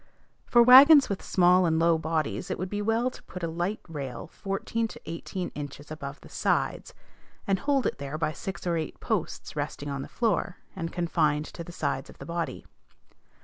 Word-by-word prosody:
For 240 Hz, -1 st, +6 dB
wagons 275 Hz, +4 st, +9 dB
with 200 Hz, -, -2 dB
small 180 Hz, 0 st, +4 dB
and 160 Hz, -1 st, +2 dB
low 165 Hz, 0 st, +3 dB
bodies, 160 Hz, -1 st, -2 dB
it -, -, -2 dB
would 185 Hz, +1 st, -4 dB
be 205 Hz, 0 st, -2 dB
well 225 Hz, +4 st, +1 dB
to -, -, -13 dB
put 180 Hz, -2 st, -9 dB
a -, -, +1 dB
light 175 Hz, +6 st, -2 dB
rail 140 Hz, -7 st, -6 dB
fourteen 205 Hz, +4 st, -2 dB
to -, -, -11 dB
eighteen 175 Hz, +2 st, -5 dB
inches 145 Hz, 0 st, -8 dB
above 140 Hz, -2 st, -7 dB
the -, -, -13 dB
sides, -, -, -1 dB, 0.5 s
and 195 Hz, -1 st, +1 dB
hold 280 Hz, -3 st, +1 dB
it -, -, -1 dB
there 140 Hz, +2 st, -4 dB
by 155 Hz, -1 st, 0 dB
six 190 Hz, +5 st, -6 dB
or 170 Hz, -1 st, +1 dB
eight 160 Hz, -, -4 dB
posts -, -, -3 dB
resting 145 Hz, 0 st, -4 dB
on 140 Hz, -1 st, -3 dB
the -, -, -6 dB
floor, 220 Hz, -5 st, 0 dB, 0.2 s
and 165 Hz, -3 st, -4 dB
confined 155 Hz, -4 st, +1 dB
to 170 Hz, -, -6 dB
the 175 Hz, -, -10 dB
sides 140 Hz, -5 st, -2 dB
of -, -, -14 dB
the -, -, -9 dB
body. 170 Hz, 0 st, -4 dB
170 Hz, 195 wpm, -27 LUFS, 155-200 Hz, 0.5 s, wagons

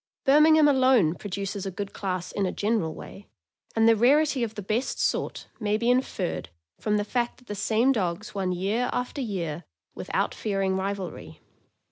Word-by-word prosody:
Birmingham 305 Hz, +2 st, +6 dB
alone 255 Hz, -, +4 dB
produces 200 Hz, +1 st, -5 dB
a -, -, -1 dB
good 195 Hz, +1 st, -6 dB
class 185 Hz, -3 st, -3 dB
in 200 Hz, -2 st, -1 dB
a -, -, -1 dB
general 205 Hz, -7 st, -1 dB
way, 95 Hz, +3 st, -11 dB, 0.5 s
and 225 Hz, 0 st, +4 dB
the 230 Hz, -, +6 dB
rarity 275 Hz, +4 st, +3 dB
of 225 Hz, -2 st, -2 dB
the 210 Hz, -, -6 dB
best 220 Hz, +7 st, -1 dB
sort -, -, -1 dB
may 210 Hz, -1 st, +1 dB
be 235 Hz, +2 st, +2 dB
inferred 250 Hz, -8 st, -1 dB, 0.3 s
from 210 Hz, -1 st, +1 dB
the 205 Hz, -, -1 dB
fact 240 Hz, +2 st, -1 dB
that 250 Hz, -, -21 dB
the 210 Hz, -, -5 dB
same 220 Hz, +5 st, +2 dB
dogs 200 Hz, -3 st, -2 dB
won 190 Hz, -2 st, -1 dB
year 200 Hz, +7 st, 0 dB
after 250 Hz, +3 st, -3 dB
year 175 Hz, -, -3 dB, 0.3 s
without -, -, -2 dB
fearing 195 Hz, -3 st, -1 dB
rivalry. 190 Hz, -1 st, -4 dB
210 Hz, 170 wpm, -26 LUFS, 190-245 Hz, 0.5 s, Birmingham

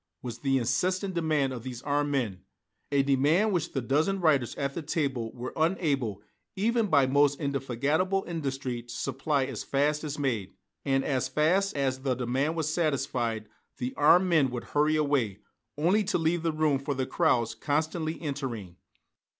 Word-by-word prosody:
was 120 Hz, -2 st, -6 dB
the 135 Hz, -1 st, +1 dB
incessant 185 Hz, -, 0 dB
demand 155 Hz, -6 st, +1 dB
of 120 Hz, -, -6 dB
these 125 Hz, 0 st, -7 dB
armed 145 Hz, 0 st, 0 dB
men, 110 Hz, -10 st, -1 dB, 0.5 s
a 140 Hz, -1 st, +3 dB
demand 145 Hz, +10 st, +3 dB
which 175 Hz, -3 st, -1 dB
the 135 Hz, -, -1 dB
dozen 155 Hz, +10 st, +1 dB
writers 145 Hz, -8 st, +2 dB
at 140 Hz, -1 st, -2 dB
the 170 Hz, -, -4 dB
table 135 Hz, -7 st, -2 dB
were 125 Hz, +1 st, -6 dB
unable 145 Hz, -, 0 dB, 0.3 s
even 225 Hz, +3 st, +1 dB
by 140 Hz, -7 st, +4 dB
most 140 Hz, +1 st, +3 dB
indefatigable 140 Hz, +7 st, 0 dB
industry 135 Hz, -7 st, -3 dB
to 120 Hz, 0 st, -13 dB
supply 135 Hz, +2 st, 0 dB
as 130 Hz, -4 st, -5 dB
fast 150 Hz, +2 st, +1 dB
as 150 Hz, -1 st, -4 dB
made. 115 Hz, -9 st, -2 dB, 0.3 s
And 135 Hz, -1 st, +1 dB
as 130 Hz, -2 st, 0 dB
fast 170 Hz, +7 st, +1 dB
as 130 Hz, -2 st, 0 dB
the 130 Hz, -1 st, 0 dB
demand 130 Hz, +6 st, -1 dB
was 155 Hz, -1 st, -1 dB
satisfied, 130 Hz, -9 st, -1 dB, 0.3 s
the 125 Hz, 0 st, -3 dB
armed 175 Hz, +5 st, +5 dB
men 155 Hz, -6 st, +3 dB
would 120 Hz, -1 st, -5 dB
hurry 150 Hz, +1 st, +3 dB
away, 140 Hz, -10 st, +1 dB, 0.4 s
only 180 Hz, +8 st, +3 dB
to 200 Hz, -, +1 dB
leave 165 Hz, 0 st, 0 dB
room 155 Hz, -3 st, +2 dB
for 140 Hz, +1 st, -3 dB
the 130 Hz, 0 st, -1 dB
crowds 125 Hz, -10 st, +1 dB
constantly 155 Hz, +2 st, -2 dB
entering. 125 Hz, -, -5 dB
140 Hz, 165 wpm, -28 LUFS, 130-160 Hz, 0.5 s, armed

